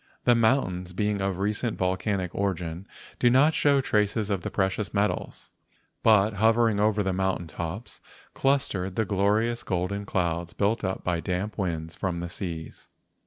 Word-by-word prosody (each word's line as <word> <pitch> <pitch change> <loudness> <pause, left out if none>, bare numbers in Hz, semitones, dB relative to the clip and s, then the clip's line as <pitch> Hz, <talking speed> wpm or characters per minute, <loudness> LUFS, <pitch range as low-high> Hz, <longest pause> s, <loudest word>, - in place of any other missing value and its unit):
The 120 - +5
mountains 100 -7 +1
being 105 +1 0
of 95 -2 -1
recent 105 +4 -1
volcanic 95 0 -1
origin 90 -2 -3 0.3
do 120 - +5
not 140 +6 +5
show 140 -2 +3
traces 105 -2 0
of 95 -2 0
the - - -4
precious 95 +2 -1
metals; 100 +1 -2 0.5
but 110 -1 +4
hovering 110 +1 +3
over 105 0 +2
the 95 -1 0
mountain 95 -1 -1
tops 85 +7 -6 0.3
clustered 105 -10 0
the 110 - +1
glorious 105 +4 +1
golden 95 +3 -2
clouds 85 -2 -1
built 105 +3 0
up 95 0 -2
by 90 -2 0
damp 90 +5 -3
winds 80 -4 -3
from 90 -1 -3
the 85 0 -5
seas. 85 -4 -6
100 Hz, 155 wpm, -26 LUFS, 90-110 Hz, 0.5 s, The